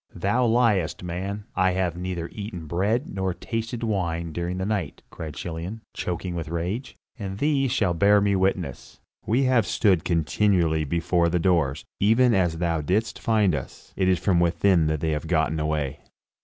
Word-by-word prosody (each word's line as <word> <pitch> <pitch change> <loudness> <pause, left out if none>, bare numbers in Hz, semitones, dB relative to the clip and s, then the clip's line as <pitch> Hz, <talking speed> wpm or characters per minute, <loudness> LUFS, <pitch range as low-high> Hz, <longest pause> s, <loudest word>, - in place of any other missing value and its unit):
"Thou 105 +8 +1
liest, 110 -9 +2
man; 95 +4 -4
I 95 0 +3
have 90 -2 0
neither 90 -1 -4
eaten 100 -6 -6
bread 100 - 0
nor 95 -2 -2
tasted 115 +3 -4
wine 85 -6 -1
during 85 +2 -3
the 95 - -2
night," 100 -7 -3
cried 80 -3 -7
Chilion, 85 +8 -5
choking 90 0 -3
with 85 -2 -4
rage, 90 +10 -3 0.2
"and 95 -2 -5
these 135 0 +1
shall 100 -9 +1
bear 100 +4 +5
me 100 0 +2
witness. 95 +1 -2 0.3
We 125 +5 +2
have 125 -5 +3
stood 95 -7 +2
continually 85 -1 +1
before 85 +3 +1
the 90 - +1
doors, 80 -6 +1
even 115 +4 +4
as 90 -5 +1
thou 85 -2 0
didst 100 +9 -1
find 105 -5 +2
us; 70 -4 -7
it 95 - +1
is 95 -1 +4
from 90 -2 +2
within 85 -1 +3
that 80 -2 -1
they 80 - 0
have 75 +1 -2
gotten 80 -2 +1
away." 75 -2 -2
90 Hz, 170 wpm, -25 LUFS, 85-105 Hz, 0.3 s, bear